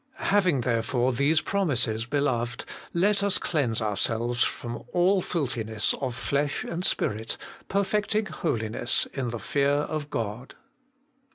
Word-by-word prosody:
' -, -, -42 dB, 0.2 s
Having 180 Hz, -10 st, +4 dB
therefore 120 Hz, +2 st, +1 dB
these 145 Hz, +6 st, +3 dB
promises, 125 Hz, -, 0 dB
beloved, 125 Hz, -4 st, 0 dB, 0.3 s
let 200 Hz, +4 st, +2 dB
us 200 Hz, -1 st, +2 dB
cleanse 125 Hz, -9 st, 0 dB
ourselves 115 Hz, +3 st, +1 dB
from 120 Hz, 0 st, -3 dB
all 185 Hz, +2 st, +4 dB
filthiness 115 Hz, -, 0 dB
of 130 Hz, -3 st, -2 dB
flesh 140 Hz, +3 st, 0 dB
and 170 Hz, +2 st, -4 dB
spirit, 110 Hz, -, 0 dB, 0.3 s
perfecting 205 Hz, +2 st, +1 dB
holiness 115 Hz, -, 0 dB
in 130 Hz, -3 st, -2 dB
the 120 Hz, -, -3 dB
fear 140 Hz, +4 st, +1 dB
of 145 Hz, +1 st, -1 dB
God.' 115 Hz, 0 st, -4 dB
135 Hz, 125 wpm, -27 LUFS, 115-170 Hz, 0.3 s, Having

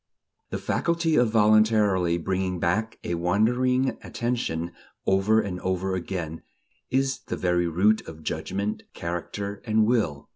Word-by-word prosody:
The -, -, -3 dB
faculty 170 Hz, -1 st, 0 dB
of 120 Hz, -2 st, +4 dB
voluntarily 105 Hz, -5 st, +4 dB
bringing 95 Hz, +1 st, -1 dB
back 110 Hz, +7 st, 0 dB
a 85 Hz, -, -2 dB
wandering 125 Hz, +9 st, +1 dB
attention, 115 Hz, -9 st, -2 dB, 0.3 s
over 95 Hz, +3 st, +3 dB
and 90 Hz, -3 st, -4 dB
over 95 Hz, +1 st, -1 dB
again 85 Hz, -3 st, -4 dB, 0.5 s
is 135 Hz, +1 st, +1 dB
the -, -, -3 dB
very 90 Hz, -1 st, +1 dB
root 100 Hz, +6 st, +2 dB
of 80 Hz, -1 st, -10 dB
judgment, 100 Hz, +6 st, -3 dB
character 100 Hz, +4 st, -4 dB
and 110 Hz, -1 st, +3 dB
will.... 105 Hz, -, 0 dB
100 Hz, 130 wpm, -26 LUFS, 90-110 Hz, 0.5 s, of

